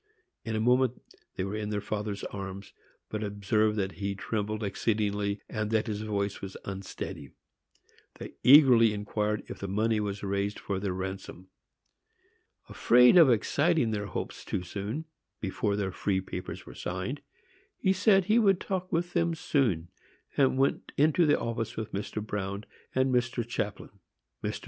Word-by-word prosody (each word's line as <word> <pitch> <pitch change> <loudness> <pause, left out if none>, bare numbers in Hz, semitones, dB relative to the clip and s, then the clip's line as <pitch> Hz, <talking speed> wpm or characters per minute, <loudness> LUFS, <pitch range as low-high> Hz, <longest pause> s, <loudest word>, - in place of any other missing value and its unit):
In 110 -2 -3
a - - 0
moment 125 +2 +3 0.4
they 95 - -2
were 95 +2 -3
in 105 -1 -3
their 105 -1 -1
father's 105 -1 -4
arms, 100 0 -6 0.4
but 110 0 -3
observed 105 +1 +1
that 95 -2 0
he 100 0 -1
trembled 110 +1 -3
exceedingly, 105 0 -1
and 105 -1 -3
that 110 -1 +1
his 105 -1 -3
voice 100 -2 -2
was 95 -1 -7
unsteady. 95 -7 -6 0.9
They - - -9
eagerly 125 -5 +7
inquired 105 0 -2
if - - -8
the 100 - -4
money 110 +3 +1
was 100 -1 -3
raised 100 +1 -1
for 100 -2 -3
their 100 -1 -2
ransom. 95 -1 -6 1.2
Afraid 125 +4 +5
of 165 -6 +8
exciting 140 +3 +2
their 105 -1 -2
hopes - - -5
too 90 - -3
soon, 105 - -4 0.3
before 100 +1 -1
their 100 -2 -1
free 95 +1 0
papers 90 -1 -6
were - - -10
signed, - - -4 0.6
he 190 - +2
said 195 0 +4
he 215 +4 +4
would 195 -5 +4
talk 185 -2 -3
with 175 0 -1
them 170 -1 +1
soon, 130 - 0 0.5
and 135 -2 +3
went 135 +1 +1
into 155 +3 +4
the 145 - +4
office 115 -1 -3
with 110 -1 -4
Mr. 105 +1 -4
Bruin 100 0 -4 0.3
and 130 0 +2
Mr. 125 -1 0
Chaplin. 110 -3 -4 0.5
Mr. - - -2
105 Hz, 160 wpm, -29 LUFS, 100-125 Hz, 1.2 s, of